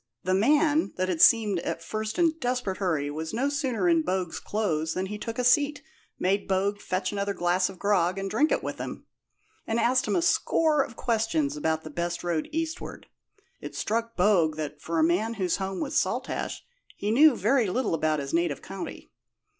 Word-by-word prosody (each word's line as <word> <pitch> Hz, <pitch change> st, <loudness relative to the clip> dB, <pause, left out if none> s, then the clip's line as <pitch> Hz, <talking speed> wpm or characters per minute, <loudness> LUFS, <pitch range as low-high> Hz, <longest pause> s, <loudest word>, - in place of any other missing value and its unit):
The 185 Hz, -, 0 dB
man, 295 Hz, -, +3 dB
that 185 Hz, 0 st, -1 dB
had 170 Hz, -3 st, -1 dB
seemed 215 Hz, -5 st, +5 dB
at 165 Hz, -, -4 dB
first 215 Hz, -, -4 dB
in 345 Hz, -, +4 dB
a -, -, -2 dB
desperate 250 Hz, -9 st, -2 dB
hurry, 155 Hz, -7 st, -1 dB
was 160 Hz, +5 st, -5 dB
no 265 Hz, +4 st, +1 dB
sooner 260 Hz, -, -1 dB
in 165 Hz, -2 st, +4 dB
Bogue's 180 Hz, 0 st, -2 dB
clothes 160 Hz, -7 st, -1 dB
than 185 Hz, -, -1 dB
he 210 Hz, +2 st, -6 dB
took 230 Hz, +2 st, -5 dB
a 250 Hz, -, 0 dB
seat, 285 Hz, +4 st, +3 dB, 0.3 s
made 195 Hz, +2 st, 0 dB
Bogue 200 Hz, +2 st, 0 dB
fetch 185 Hz, +1 st, -2 dB
another 200 Hz, 0 st, -2 dB
glass 180 Hz, +2 st, +1 dB
of 190 Hz, -, -10 dB
grog 185 Hz, -2 st, +1 dB
and 195 Hz, 0 st, -3 dB
drink 235 Hz, +11 st, +1 dB
it -, -, +1 dB
with -, -, -5 dB
him, -, -, -6 dB, 0.6 s
and 225 Hz, +1 st, 0 dB
asked 250 Hz, +2 st, +2 dB
him -, -, +1 dB
a 345 Hz, -, +2 dB
score 315 Hz, -3 st, +2 dB
of 240 Hz, -3 st, -5 dB
questions 215 Hz, -, 0 dB
about 160 Hz, +1 st, -1 dB
the 155 Hz, -, -8 dB
best 170 Hz, +2 st, -3 dB
road 170 Hz, -3 st, -1 dB
eastward. 325 Hz, +2 st, -4 dB, 0.5 s
It -, -, -8 dB
struck 230 Hz, +1 st, -2 dB
Bogue 180 Hz, -5 st, +3 dB
that, 150 Hz, -1 st, -5 dB
for 165 Hz, 0 st, -3 dB
a 160 Hz, -, +4 dB
man 200 Hz, +8 st, +1 dB
whose 185 Hz, -5 st, 0 dB
home 190 Hz, -1 st, -4 dB
was 295 Hz, 0 st, +1 dB
Saltash, -, -, -3 dB, 0.3 s
he 205 Hz, -, -1 dB
knew 285 Hz, +3 st, +6 dB
very 230 Hz, +1 st, +2 dB
little 235 Hz, 0 st, -1 dB
about 155 Hz, -1 st, +1 dB
his 140 Hz, -1 st, -5 dB
native 170 Hz, -4 st, 0 dB
county. 95 Hz, -, -8 dB
200 Hz, 200 wpm, -27 LUFS, 170-240 Hz, 0.6 s, knew